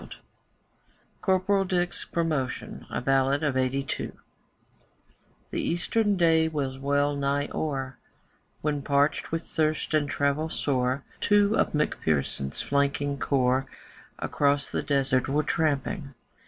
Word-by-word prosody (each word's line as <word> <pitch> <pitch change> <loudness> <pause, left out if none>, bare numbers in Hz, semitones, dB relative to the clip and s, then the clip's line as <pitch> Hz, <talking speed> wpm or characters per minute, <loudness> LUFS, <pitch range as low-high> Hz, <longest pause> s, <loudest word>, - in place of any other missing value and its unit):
CORPORAL 195 +1 +2
DICK'S 175 -1 -1
PROMOTION 155 -7 -2
A - - -3
BALLAD 135 +2 +2
OF 145 -3 +1
'82 130 +1 -1 1.4
The - - -1
Eastern 205 +4 +1
day 165 -2 +4
was 140 -4 -3
well 145 +1 +1
nigh 140 +1 0
o'er 135 -4 -3 0.6
When, 145 -1 -1
parched 140 +2 +1
with 165 0 -1
thirst 155 0 -1
and 150 -2 +2
travel 145 +3 0
sore, 130 -2 0 0.2
Two 205 +1 +3
of - - +1
McPherson's 75 - 0
flanking 140 0 0
corps 130 -1 +1 0.5
Across 140 -1 +1
the - - -1
Desert 135 -3 +1
were 150 +2 +2
tramping. 150 -1 -1
145 Hz, 115 wpm, -27 LUFS, 135-160 Hz, 1.4 s, day